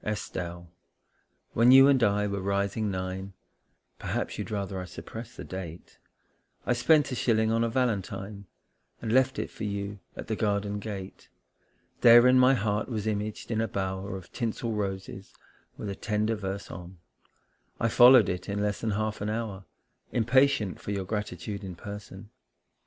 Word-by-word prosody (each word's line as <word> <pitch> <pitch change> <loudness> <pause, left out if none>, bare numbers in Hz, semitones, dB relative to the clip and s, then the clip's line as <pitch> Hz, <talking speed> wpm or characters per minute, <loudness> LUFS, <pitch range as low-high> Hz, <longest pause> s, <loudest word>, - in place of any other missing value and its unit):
] - - -34
ESTELLE, 85 -4 -4 0.9
when 115 +2 +5
you 135 +1 +9
and 135 -3 +4
I 105 -1 +3
were 100 -1 -2
rising 100 +2 -1
nine 95 +1 -4 0.7
Perhaps - - -3
you'd - - -4
rather 100 -2 -3
I 90 - -5
suppressed 115 +6 -9
the - - -6
date 90 -3 -8 0.7
I - - +2
spent 145 +4 +3
a - - -2
shilling 110 -2 +2
on 115 +1 +2
a 115 - +1
valentine 100 -4 -2 0.5
And 110 - -3
left 130 0 +3
it - - -3
for 110 - -8
you 100 0 -4 0.2
at - - -7
the 110 - -2
garden 105 -1 -1
gate. 100 -3 -7 0.7
Therein 120 +2 +8
my 130 +1 +6
heart 105 0 -1
was 110 -4 -3
imaged 105 +1 -3
in 110 -1 +1
a 115 - 0
bower 95 0 -3
Of 95 - -13
tinsel 115 0 -3
roses, 95 -2 -5 0.4
with - - -6
a 100 - -4
tender 105 +2 -1
verse 100 -2 -5
on; 90 +1 -9 0.8
I 115 - +2
followed 120 0 +7
it 90 +2 -4
in 100 +1 -2
less 105 -1 -1
than 115 - -1
half 110 -1 -2
an 105 - -1
hour 105 -3 -4 0.5
Impatient 120 -3 +2
for - - -8
your 100 -2 -2
gratitude 105 0 -4
in 95 -2 -6
person. 105 +2 -9
105 Hz, 165 wpm, -28 LUFS, 95-115 Hz, 0.9 s, you